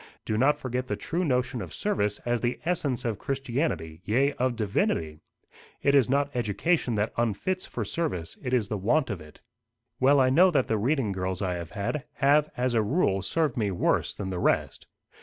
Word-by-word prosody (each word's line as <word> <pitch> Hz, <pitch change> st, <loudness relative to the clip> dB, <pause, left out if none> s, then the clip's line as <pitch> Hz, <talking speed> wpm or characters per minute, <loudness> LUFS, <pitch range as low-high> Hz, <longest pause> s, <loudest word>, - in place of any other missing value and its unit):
Do 110 Hz, -, -1 dB
not 135 Hz, +7 st, +3 dB
forget 125 Hz, 0 st, -3 dB
the -, -, -1 dB
true 180 Hz, +1 st, -2 dB
notion 125 Hz, -5 st, 0 dB
of -, -, -7 dB
service 105 Hz, -, -1 dB
as 120 Hz, -1 st, 0 dB
the 120 Hz, 0 st, -1 dB
essence 145 Hz, -9 st, -1 dB
of 110 Hz, -4 st, -2 dB
Christianity, 120 Hz, -, -2 dB
yea, 130 Hz, +8 st, +2 dB
of 125 Hz, -1 st, +1 dB
divinity. 80 Hz, -7 st, -1 dB, 0.6 s
It 140 Hz, -, +4 dB
is 135 Hz, -4 st, +4 dB
not 140 Hz, +1 st, +1 dB
education 120 Hz, -, 0 dB
that 105 Hz, +1 st, -1 dB
unfits 120 Hz, -, -1 dB
for -, -, -4 dB
service: 90 Hz, -, -3 dB
it 125 Hz, -, -4 dB
is 120 Hz, -5 st, +2 dB
the 105 Hz, -1 st, -3 dB
want 120 Hz, +6 st, +1 dB
of 95 Hz, -5 st, -5 dB
it." 75 Hz, 0 st, -15 dB, 0.6 s
"Well, 140 Hz, +2 st, +5 dB
I 130 Hz, -1 st, +4 dB
know 180 Hz, +7 st, +6 dB
that 140 Hz, -7 st, +1 dB
the 110 Hz, -1 st, 0 dB
reading 125 Hz, -1 st, +1 dB
girls 95 Hz, 0 st, -3 dB
I 90 Hz, -1 st, 0 dB
have 85 Hz, -2 st, -5 dB
had, 105 Hz, +8 st, -3 dB
have, 145 Hz, +2 st, +3 dB
as 125 Hz, 0 st, 0 dB
a 115 Hz, -, +3 dB
rule, 105 Hz, -, +1 dB
served 150 Hz, -, 0 dB
me 105 Hz, -3 st, +1 dB
worse 90 Hz, -, 0 dB
than 95 Hz, -2 st, -4 dB
the 90 Hz, -, -3 dB
rest." -, -, 0 dB
120 Hz, 195 wpm, -27 LUFS, 100-140 Hz, 0.6 s, know